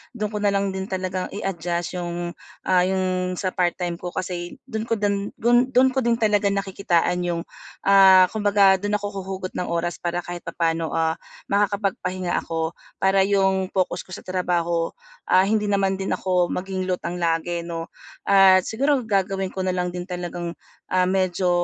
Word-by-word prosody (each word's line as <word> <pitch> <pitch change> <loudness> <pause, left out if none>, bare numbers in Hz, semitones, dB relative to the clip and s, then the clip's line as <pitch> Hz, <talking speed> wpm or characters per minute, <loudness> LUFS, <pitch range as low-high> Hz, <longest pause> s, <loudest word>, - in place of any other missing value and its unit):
dun 210 -2 -3
ko 210 - -3
nalang 200 -1 +1
din 190 +1 -4
talagang 185 -1 -3
i-adjust 175 -2 -3
yung, 175 0 -4 0.3
ah, 180 -1 +3
yung 185 -1 -1
sa 185 0 -2
part-time 175 -1 -1
ko 175 -1 -6
kasi 175 -1 -4
dun 225 -3 -5
ko 230 - +1
dun 200 -1 -1
dun 240 +2 +3
dun 260 +1 +5
ko 265 - 0
din 235 -2 +2
talaga 210 -3 +2
nakikitaan 190 -3 0
yung, 170 -1 -1 0.4
ah, 190 -2 +7
kumbaga 200 -2 +4
dun 205 +1 -1
ako 205 -1 -3
huhugot 190 -1 -5
ng 180 - -2
oras 170 0 -2
para 175 0 -2
kahit 175 0 -7
papaano, 165 -1 -1
ah, 160 0 0 0.3
makakapagpahinga 195 -3 0
ako, 165 0 -3 0.3
para 190 0 +4
yung 190 -1 +2
focus 185 -2 -1
ko 185 - -17
sa - - -11
trabaho, 175 -2 -1 0.3
ah, 185 - +5
hindi 210 +1 +1
naman 195 -1 +1
din 195 - -1
ako 180 -2 +1
maging 185 0 -3
lutang 180 -1 -3
lagi 170 0 0
'no 165 -1 -5 0.3
at 190 -1 +6
siguro 275 +6 +1
gagawin 195 -3 0
ko 190 - -7
nalang 180 -1 -1
din 175 0 -5
talagang, 175 -1 -5 0.4
ah, 185 0 +3
medyo, 185 -1 +1
185 Hz, 165 wpm, -23 LUFS, 175-200 Hz, 0.4 s, ah